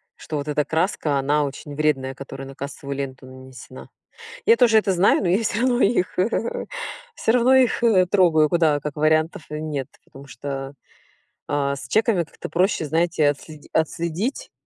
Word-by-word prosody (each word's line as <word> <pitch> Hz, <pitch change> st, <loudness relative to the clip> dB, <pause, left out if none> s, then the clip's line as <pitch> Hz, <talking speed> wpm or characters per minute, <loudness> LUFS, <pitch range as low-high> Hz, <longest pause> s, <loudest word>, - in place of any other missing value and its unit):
Что 155 Hz, -, -6 dB
вот 145 Hz, +1 st, -4 dB
эта 150 Hz, 0 st, 0 dB
краска, 160 Hz, -3 st, 0 dB
она 145 Hz, +2 st, +1 dB
очень 145 Hz, +1 st, -7 dB
вредная, 140 Hz, -3 st, 0 dB
которая 135 Hz, 0 st, -8 dB
на 135 Hz, -, -11 dB
кассовую 140 Hz, 0 st, -6 dB
ленту 135 Hz, -1 st, -6 dB
нанесена. 130 Hz, -, -12 dB, 0.6 s
Я 230 Hz, -, +6 dB
тоже 230 Hz, -2 st, +5 dB
это 205 Hz, -, 0 dB
знаю, 185 Hz, +3 st, +3 dB
но 190 Hz, -, 0 dB
я 195 Hz, +6 st, +2 dB
всё 215 Hz, +1 st, -1 dB
равно 250 Hz, 0 st, +2 dB
их, 200 Hz, -3 st, +1 dB, 1.0 s
всё -, -, +1 dB
равно 250 Hz, +1 st, +4 dB
их 255 Hz, -2 st, +3 dB, 0.3 s
трогаю, 165 Hz, -6 st, +4 dB
куда, 160 Hz, -3 st, +2 dB
как 145 Hz, 0 st, -6 dB
вариантов 155 Hz, +1 st, +1 dB
нет, 150 Hz, -3 st, -4 dB, 0.2 s
потому 135 Hz, +1 st, -14 dB
что, 135 Hz, +1 st, -6 dB, 0.7 s
а, 140 Hz, -1 st, 0 dB
с 130 Hz, -3 st, -9 dB
чеками 215 Hz, -, +2 dB
как-то -, -, -10 dB
проще, 175 Hz, +1 st, +1 dB
знаете, 160 Hz, 0 st, +2 dB
отсле 150 Hz, +1 st, -6 dB
отследить 170 Hz, -, -2 dB
155 Hz, 160 wpm, -22 LUFS, 140-180 Hz, 1.0 s, Я